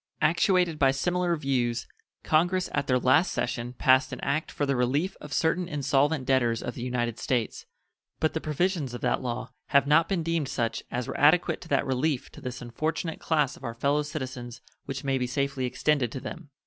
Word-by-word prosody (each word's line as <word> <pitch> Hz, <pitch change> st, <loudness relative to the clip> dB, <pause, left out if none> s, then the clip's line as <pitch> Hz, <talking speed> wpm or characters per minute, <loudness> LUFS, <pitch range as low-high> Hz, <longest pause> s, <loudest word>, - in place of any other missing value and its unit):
Actuated 175 Hz, 0 st, +3 dB
by 135 Hz, -, +5 dB
similar 175 Hz, +6 st, +1 dB
views, 125 Hz, -5 st, -1 dB, 0.4 s
Congress 175 Hz, +4 st, +2 dB
at 145 Hz, -1 st, -1 dB
their 125 Hz, -, +3 dB
last 130 Hz, +8 st, +3 dB
session 120 Hz, 0 st, -2 dB
passed 130 Hz, +1 st, +3 dB
an -, -, -5 dB
act 155 Hz, +3 st, -1 dB
for 145 Hz, -, -1 dB
the 140 Hz, -1 st, +1 dB
relief 135 Hz, +9 st, 0 dB
of 150 Hz, -, -9 dB
certain 170 Hz, +3 st, +1 dB
insolvent 140 Hz, -1 st, +1 dB
debtors 120 Hz, -4 st, +2 dB
of 125 Hz, -, -4 dB
the -, -, -8 dB
United 120 Hz, -2 st, -2 dB
States, 120 Hz, -4 st, -2 dB, 0.5 s
but 155 Hz, -, +1 dB
the 160 Hz, -, -2 dB
provisions 155 Hz, -4 st, -1 dB
of -, -, -7 dB
that -, -, +1 dB
law 125 Hz, -1 st, -4 dB, 0.2 s
have 140 Hz, -1 st, +4 dB
not 150 Hz, +3 st, +4 dB
been 185 Hz, -4 st, 0 dB
deemed 165 Hz, -4 st, -1 dB
such 115 Hz, -2 st, -1 dB
as 125 Hz, -1 st, -3 dB
were -, -, -4 dB
adequate 155 Hz, +4 st, +4 dB
to -, -, -10 dB
that 140 Hz, -3 st, +1 dB
relief 135 Hz, +1 st, -1 dB
to 150 Hz, -, -12 dB
this 125 Hz, -2 st, -6 dB
unfortunate 155 Hz, +7 st, -3 dB
class 150 Hz, -5 st, +1 dB
of -, -, -16 dB
our 115 Hz, -2 st, -4 dB
fellow 140 Hz, +5 st, +1 dB
citizens 130 Hz, -5 st, -6 dB, 0.3 s
which 135 Hz, 0 st, -5 dB
may 135 Hz, -1 st, 0 dB
be 125 Hz, -, -1 dB
safely 140 Hz, +1 st, -1 dB
extended 135 Hz, -2 st, +1 dB
to 130 Hz, -, -5 dB
them. 155 Hz, +3 st, -8 dB
140 Hz, 200 wpm, -27 LUFS, 125-160 Hz, 0.5 s, by